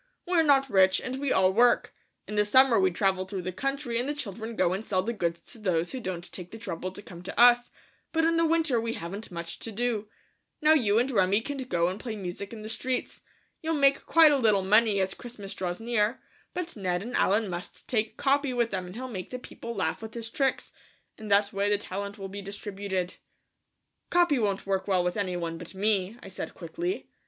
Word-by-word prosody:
"We're 350 -2 +3
not 275 -3 +4
rich 190 -4 +4
and 255 +1 -4
we 280 -1 -1
all 190 0 +4
work. 240 +3 +4 0.3
In - - -6
the 210 0 +3
summer 250 +3 +5
we 190 -1 +4
travel 190 +1 +1
through 190 -2 -4
the 185 - -3
country 275 +3 -2
and 255 +4 -2
the 295 - -1
children 225 -3 -5
go 180 -3 +2
and 195 +3 -3
sell 185 -4 0
the 235 - -2
goods 170 -5 -2
to 230 - -10
those 175 -5 0
who 260 - -5
won't 180 -4 -5
take 180 -2 -6
the 225 - -9
trouble 185 -3 -4
to 205 - -9
come 175 -3 -10
to 180 - -6
us, 245 0 +7 0.4
but 325 0 +2
in 330 0 +3
the 330 - +3
winter 320 -7 +2
we 230 0 -2
haven't 195 +5 -6
much 170 -1 -6
to 225 - -5
do. 220 -1 -1 0.5
Now 305 +1 +5
you 220 -9 +3
and 250 +4 +2
Remi 195 -2 +3
can 285 +4 -5
go 175 -10 0
and 185 +3 -3
play 230 -3 -5
music 195 0 -6
in 220 -2 -8
the - - -6
streets. 250 +3 -3 0.4
You'll 325 0 0
make 275 -1 +3
quite 325 -2 +7
a 285 - +3
little 210 -5 +3
money 210 +1 +4
as 190 0 0
Christmas 215 -5 -8
draws 180 -1 -3
near, 230 +1 0 0.4
but 355 -1 -3
Ned 180 -3 -1
and 245 +3 -5
Allen 210 +3 +3
must 175 0 -6
take 220 -3 -1
Capi 280 -1 +2
with 235 -1 +1
them 185 -2 -3
and 180 - -10
he'll 260 +2 -5
make 190 -8 -6
the 250 - -4
people 235 -1 -8
laugh 160 -3 -1
with 220 0 -8
his 230 -1 -5
tricks; 270 0 0 0.5
in 220 - -8
that 200 +1 +3
way 200 +1 +1
the 205 - +3
talent 200 0 -5
will 195 -1 -6
be 200 +1 -7
distributed." 195 -2 -4 0.9
"Capi 345 -6 +3
won't 200 -3 0
work 195 0 -1
well 185 -3 +2
with 180 0 -1
any 185 -3 -1
one 165 -1 -4
but 175 +2 -10
me," 200 +1 0
I - - -9
said 190 - -6
quickly. 345 - -4
210 Hz, 225 wpm, -28 LUFS, 190-245 Hz, 0.9 s, us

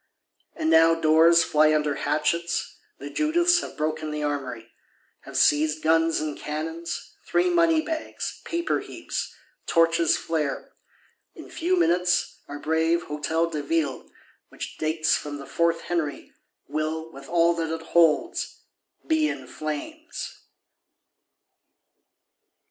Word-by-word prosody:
And 160 - 0
now 165 0 +6
doors 165 +1 +5
fly 155 -1 +4
under 150 -1 +1
hatchets; 150 +4 -1 0.2
the 145 +1 -8
Judiths 345 - +3
have - - -8
broken 155 0 -2
the 150 0 -3
Armoury; 130 -6 -4 0.5
have - - -5
seized 150 +1 +3
guns 165 +1 +3
and 150 -1 -3
cannons, 160 +3 -5 0.2
three 355 +1 +2
money 335 -2 +4
bags, 315 0 -5
paper 340 -1 -1
heaps; - - -5 0.3
torches 165 -1 +3
flare: 150 -4 -3 0.6
in - - -11
few 355 +3 0
minutes, 180 - +1
our 145 - -6
brave 160 +3 +1
Hôtel 160 +3 -1
de 150 - -2
Ville 145 -2 -1 0.4
which - - -8
dates 155 0 +1
from 145 -1 -5
the 140 - -9
Fourth 170 +2 +1
Henry, 165 -5 -3 0.4
will, 155 +1 -3
with 135 -2 -12
all 170 0 +4
that 165 -1 -3
it 165 0 -6
holds, 170 - +2 0.4
be 315 -1 +2
in 130 - -5
flames! 155 - -6
160 Hz, 125 wpm, -25 LUFS, 150-170 Hz, 0.6 s, now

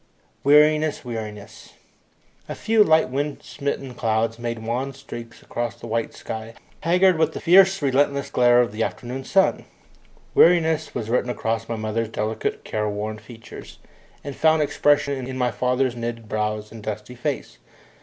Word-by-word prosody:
Weariness! 150 0 +4
Weariness! 110 -4 -8 0.8
A - - -4
few 220 -1 +3
light 160 -6 +3
wind 145 +2 -3
smitten 140 -2 -4
clouds 115 0 -1
made 115 -1 -4
wan 130 +4 -2
streaks 120 -4 -10
across 120 -1 -3
the - - -11
white 115 0 -2
sky, 110 +1 -7 0.2
haggard 180 +1 +3
with 160 0 +2
the - - -5
fierce 190 +2 +5
relentless 140 +1 +1
glare 120 0 +5
of 120 - -1
the 105 +2 -5
afternoon 125 +3 -3
sun. 190 +5 +2 0.7
Weariness 160 -2 +4
was 110 - -3
written 125 0 +1
across 115 -1 -2
my 115 - -1
mother's 110 +1 -2
delicate 110 0 -3
careworn 105 0 -3
features, 115 -1 -12 0.5
and 140 -2 -6
found 160 -1 +3
expression 145 -3 +1
in 130 0 -5
my 125 -1 +1
father's 125 +1 0
knitted 115 -1 -5
brows 105 0 -2
and 115 -1 -10
dusty 105 +2 -6
face. 115 - -4
125 Hz, 150 wpm, -23 LUFS, 110-145 Hz, 0.8 s, fierce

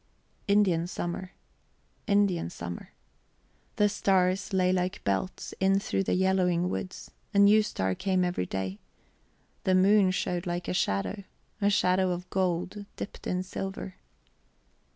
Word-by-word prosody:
Indian 190 -5 +3
summer 180 +1 -4 0.7
Indian 200 - +2
summer. 85 0 -7 0.8
The 210 - +4
stars 190 -1 +1
lay 185 -1 +2
like 185 +2 -1
belts 100 - -2
in 195 0 +3
through 195 -1 -1
the - - +1
yellowing 180 -2 +2
woods; 185 - -5 0.2
a - - +3
new 205 +2 +7
star 95 - -1
came 185 - +1
every 175 - -2
day. 95 +1 -4 0.8
The 185 - +3
moon 195 +1 +5
showed 180 -1 -2
like 175 0 -3
a - - -1
shadow; 100 - -1 0.4
a 200 - +4
shadow 185 -2 +3
of 180 0 -3
gold 185 +2 -1
dipped - - -7
in 180 0 -1
silver... 190 0 -5
185 Hz, 130 wpm, -28 LUFS, 175-195 Hz, 0.8 s, new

